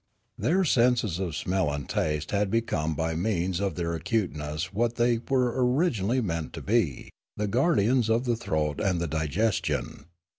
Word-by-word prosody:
Their 185 +4 +1
senses 120 - +2
of 90 -5 -3
smell 90 -1 0
and 70 -2 -4
taste 75 -1 -1
had 100 -1 +1
become 95 -9 0
by 80 +2 -1
means 90 0 -1
of 100 -1 -1
their 85 -1 -2
acuteuess 80 -3 -2
what 115 +3 0
they 120 -1 +2
were 125 -3 +2
originally 125 - +1
meant 85 -7 -3
to - - -6
be, 100 - 0 0.3
the 105 - 0
guardians 120 - +2
of 115 +2 +2
the 120 -1 +1
throat 75 -9 -2
and 95 -4 +1
the 85 - -1
digestion. 80 +1 -1
100 Hz, 160 wpm, -27 LUFS, 80-115 Hz, 0.3 s, senses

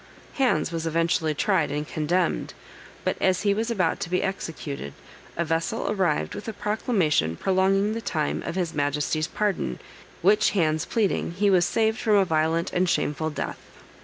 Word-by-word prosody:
Hands 220 - +1
was 165 -1 -3
eventually 165 -1 +1
tried - - +1
and 150 +1 -3
condemned, 170 +3 -1 0.5
but - - 0
as 185 0 +2
he 200 -1 +3
was 225 +3 -1
about 185 -8 0
to - - -4
be 180 +1 +1
executed, 155 - -4 0.4
a 170 - 0
vessel 165 +8 -1
arrived 185 -7 0
with 205 - -7
a 225 - -3
proclamation 190 - 0
prolonging 195 - +2
the 230 - -3
time 155 -8 -1
of 170 - -5
his 180 -3 -1
Majesty's 150 +2 0
pardon, 190 - -1 0.5
which 210 +3 +5
Hands 155 -3 +2
pleading, 205 -6 0
he 200 +3 +2
was 180 -2 +4
saved 220 +1 +1
from 215 -2 +2
a 195 -1 +5
violent 160 +1 0
and 180 0 +2
shameful 155 -1 0
death. 150 - -4
175 Hz, 165 wpm, -25 LUFS, 155-200 Hz, 0.5 s, which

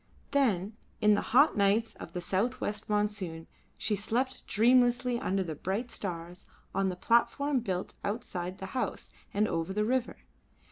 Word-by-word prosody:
Then 215 -8 +1 0.2
in 210 0 +5
the 205 - +2
hot 285 +6 +5
nights 210 +2 +2
of - - -10
the 180 - -3
south 220 +8 0
west 210 -1 -3
monsoon 205 -6 -1 0.3
she 215 - +1
slept 245 +6 -1
dreamlessly 245 +2 +3
under 195 -3 0
the 165 -3 -4
bright 195 - -3
stars 175 -2 -6 0.2
on 195 0 +1
the 180 - -3
platform 250 +7 +2
built 190 -5 -3
outside 190 -4 -3
the 190 - -6
house 255 - -3 0.2
and 210 +1 +2
over 165 +1 -2
the 210 +1 +1
river. 255 +1 0
210 Hz, 155 wpm, -30 LUFS, 190-240 Hz, 0.3 s, in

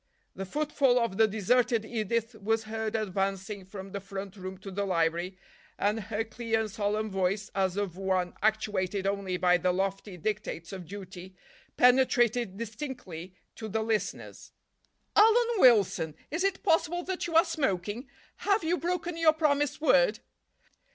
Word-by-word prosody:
The 195 - -5
footfall 285 0 +2
of 230 -5 0
the 220 - +5
deserted 225 +2 +2
Edith 230 +1 -2
was 225 +2 +1
heard 220 0 -3
advancing 195 -1 -2
from 195 0 -9
the 200 - -4
front 195 0 -7
room 190 -1 -7
to 195 +1 -9
the 200 +2 -2
library, 175 0 0 0.4
and 210 +2 +1
her 215 +1 -2
clear 225 -1 -1
and 215 -2 -4
solemn 215 0 -1
voice, 195 +2 -1
as 190 -1 0
of 195 -4 -2
one 185 -2 0
actuated 205 -3 0
only 195 -2 -1
by 180 0 +4
the 180 +1 +1
lofty 195 +1 -2
dictates 195 -3 -4
of 185 -3 -7
duty, 190 -1 -9 0.4
penetrated 245 -4 +3
distinctly 220 - -7 0.2
to 220 - -6
the 220 +2 -1
listeners. 220 -1 -3 0.6
"Alan 450 +3 +6
Wilson, 200 - +4 0.2
is 325 +4 -1
it 390 -1 0
possible 350 0 +2
that 370 -1 -3
you 330 - -4
are 330 +3 +7
smoking? 215 - -2 0.3
Have 405 -1 +1
you 340 +2 +1
broken 350 0 -2
your 325 -2 +5
promised 295 -2 +1
word?" - - +4
210 Hz, 150 wpm, -29 LUFS, 190-250 Hz, 0.6 s, are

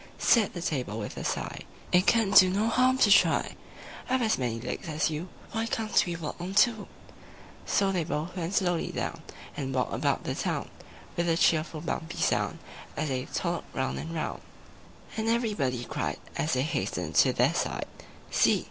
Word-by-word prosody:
Said 220 -6 +3
the 175 - -4
Table 125 -10 -2
with 105 -2 -5
a - - -5
sigh, - - -3 0.3
"It 180 +1 +4
can 225 -4 +4
do 185 -2 +8
no 205 +4 +1
harm 255 +2 +3
to 205 - +2
try. 195 - +4 0.5
I've 260 -1 +2
as 220 -8 +1
many 120 -3 -1
legs 120 - -5
as 155 +1 0
you: 160 +4 -4 0.2
Why 225 +1 -1
can't 220 -1 +2
we 170 - -2
walk 165 0 -6
on 185 +2 -5
two?" 240 +3 +6
III 215 -3 -9 0.8
So 195 -1 +2
they 180 -3 0
both 160 +3 -3
went 180 +1 -3
slowly 175 -4 +1
down, - - -4 0.3
And 135 -2 -3
walked 125 -3 0
about - - 0
the - - -2
town - - -3 0.4
With 170 0 0
a 165 - +2
cheerful 155 -2 +2
bumpy 165 0 -4
sound - - +1 0.4
As 155 - -1
they 130 -1 -2
toddled 170 -1 -2
round 130 0 -1
and 160 - -6
round; 160 - -3 0.8
And 220 0 0
everybody 205 - 0
cried, - - -3 0.2
As 155 - 0
they 130 0 +2
hastened 155 - -2
to - - +6
their - - +2
side, - - -2 0.5
"See! - - +4
170 Hz, 185 wpm, -28 LUFS, 150-205 Hz, 0.8 s, do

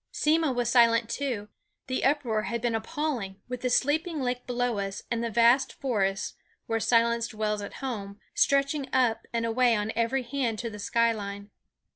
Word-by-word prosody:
Simmo 315 -1 +2
was 245 -2 -1
silent 235 -2 +4
too; 245 -7 -2 0.4
the 255 -1 -2
uproar 265 -6 +1
had 235 +2 -3
been 235 0 -1
appalling, 225 -5 -3
with 250 -1 -5
the 250 - 0
sleeping 310 +6 +1
lake 250 -1 -2
below 245 -3 0
us, 195 0 -4
and 235 0 0
the 235 - -1
vast 235 +4 +4
forest, 195 -7 -1 0.3
where 225 0 -1
silence 235 0 +2
dwells 215 -2 -2
at 200 - -7
home, 200 -5 -5
stretching 275 0 +2
up 230 -3 +1
and 230 0 -1
away 235 +1 +3
on 210 0 -1
every 235 +3 +1
hand 240 -3 -2
to 230 +1 -4
the 210 - -9
sky 230 +3 +2
line. 200 -1 -6
235 Hz, 175 wpm, -28 LUFS, 220-255 Hz, 0.4 s, silent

